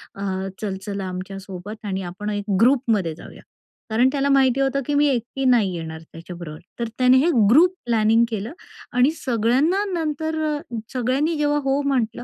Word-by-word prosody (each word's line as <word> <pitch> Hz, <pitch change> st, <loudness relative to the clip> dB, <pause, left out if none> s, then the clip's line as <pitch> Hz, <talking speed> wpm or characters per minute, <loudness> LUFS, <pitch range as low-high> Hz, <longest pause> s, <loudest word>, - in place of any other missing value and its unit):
अ, 195 Hz, -, -9 dB, 0.4 s
चल-चल 200 Hz, -1 st, -4 dB
आमच्यासोबत 195 Hz, +2 st, -7 dB
आणि 190 Hz, -1 st, -2 dB
आपण 205 Hz, +4 st, -6 dB
1 205 Hz, 0 st, -4 dB
ग्रुपमध्ये 225 Hz, -, +2 dB
जाऊया. -, -, -13 dB, 0.5 s
कारण 240 Hz, +4 st, +3 dB
त्याला 280 Hz, 0 st, 0 dB
माहिती 270 Hz, -1 st, +3 dB
होतं 275 Hz, +1 st, +1 dB
की 290 Hz, -, -2 dB
मी 290 Hz, +1 st, +4 dB
एकटी 260 Hz, +2 st, -2 dB
नाही 225 Hz, -7 st, +3 dB
येणार 160 Hz, -1 st, -6 dB
त्याच्याबरोबर, 165 Hz, -1 st, -10 dB, 0.2 s
तर 235 Hz, -, -1 dB
त्याने 255 Hz, 0 st, +5 dB
हे 315 Hz, +6 st, +3 dB, 0.2 s
ग्रुप 340 Hz, +10 st, +6 dB
प्लॅनिंग 225 Hz, 0 st, +3 dB
केलं 220 Hz, +5 st, -4 dB, 0.4 s
आणि 255 Hz, +4 st, +5 dB
सगळ्यांना, 260 Hz, -, +1 dB
नंतर 315 Hz, -1 st, -2 dB, 0.2 s
अ, 290 Hz, -, -3 dB, 0.3 s
सगळ्यांनी 260 Hz, +6 st, 0 dB
जेव्हा 295 Hz, 0 st, +1 dB
हो 275 Hz, +1 st, +1 dB
म्हटलं 245 Hz, -3 st, -1 dB
235 Hz, 155 wpm, -22 LUFS, 200-275 Hz, 0.5 s, ग्रुप